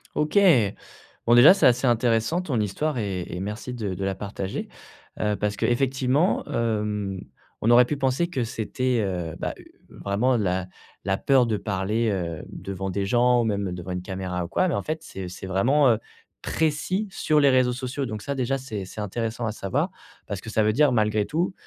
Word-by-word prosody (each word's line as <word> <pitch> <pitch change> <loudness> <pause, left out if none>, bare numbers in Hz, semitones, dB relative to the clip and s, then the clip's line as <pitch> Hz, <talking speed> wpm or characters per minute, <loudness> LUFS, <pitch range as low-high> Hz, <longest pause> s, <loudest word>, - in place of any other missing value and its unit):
OK. 155 +7 +2 0.9
Bon 120 - +6
déjà 130 +10 +9
c'est - - +4
assez 125 +1 +3
intéressant 120 +7 +2
ton 140 -10 -2
histoire 130 +8 -1
et 95 -5 -2
et 90 - -6
merci 105 +5 -5
de 105 -6 -3
de 95 - -5
la 95 -1 -1
partager. 100 -1 -5 0.5
Heu, 105 -1 +1
parce 105 -1 -2
qu'effectivement, 130 - +1
hem, 105 -4 -1 0.4
on 115 - +2
aurait 125 +1 +8
pu 145 +2 -3
penser 135 +5 +1
que 135 -9 -2
c'était, 120 +1 -1
heu, 90 -4 -3
bah, - - -2 0.4
vraiment 115 +6 0
la 95 -3 -1 0.4
la 95 0 0
peur 135 -3 +3
de 110 -2 0
parler, 105 +4 -1
heu, 85 -4 -3
devant 95 0 -5
des 100 +1 -1
gens 120 +3 +3
ou - - +1
même 100 -4 -1
devant 90 0 -6
une 90 0 -3
caméra 90 -2 -4
ou - - -7
quoi, 185 - +1
mais - - 0
en - - -2
fait 160 +1 -4
c'est 95 -1 -7
c'est 90 +1 -8
vraiment, 130 +9 +3
heu, 110 - +2 0.4
précis 160 +7 -1
sur 155 -5 +2
les 140 - +6
réseaux 130 -1 +3
sociaux 130 +2 -3
donc 110 -3 -5
ça 140 0 -3
déjà 135 +1 0
c'est 110 -8 -5
c'est 105 +3 -7
intéressant 115 +3 -3
à - - -1
savoir 130 - -1 0.4
parce 100 -2 -4
que 110 - -8
ça 110 +1 +2
veut 110 - +3
dire, 145 +1 +4
malgré 105 -2 +2
tout, 175 +4 -1
115 Hz, 195 wpm, -25 LUFS, 100-130 Hz, 0.9 s, déjà